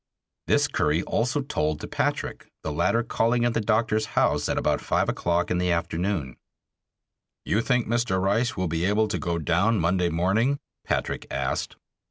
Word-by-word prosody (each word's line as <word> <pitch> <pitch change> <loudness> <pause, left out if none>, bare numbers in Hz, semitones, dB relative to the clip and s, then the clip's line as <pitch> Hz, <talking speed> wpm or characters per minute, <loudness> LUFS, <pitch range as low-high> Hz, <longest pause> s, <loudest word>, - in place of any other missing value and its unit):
This - - +3
Curry 75 +4 +1
also 125 +5 0
told 80 - -1
to - - -6
Patrick, - - -2
the 80 - -2
latter 90 +10 +1
calling 120 +2 +1
at 120 - +1
the 115 - 0
doctor's 110 0 +1
house - - +2
about - - 0
five - - +1
o'clock 85 0 0
in 90 - +1
the 90 0 +1
afternoon. 85 -4 -2 1.1
"You 110 - +1
think 125 0 +1
Mr. 115 -4 0
Rice 105 +6 +1
will 95 -1 0
be 80 +1 -1
able 105 +3 +2
to 100 - -2
go 85 -2 -1
down 90 +7 +2
Monday 90 +1 +1
morning?" 100 - +1 0.3
Patrick - - -2
asked. - - -2
95 Hz, 165 wpm, -25 LUFS, 85-115 Hz, 1.1 s, This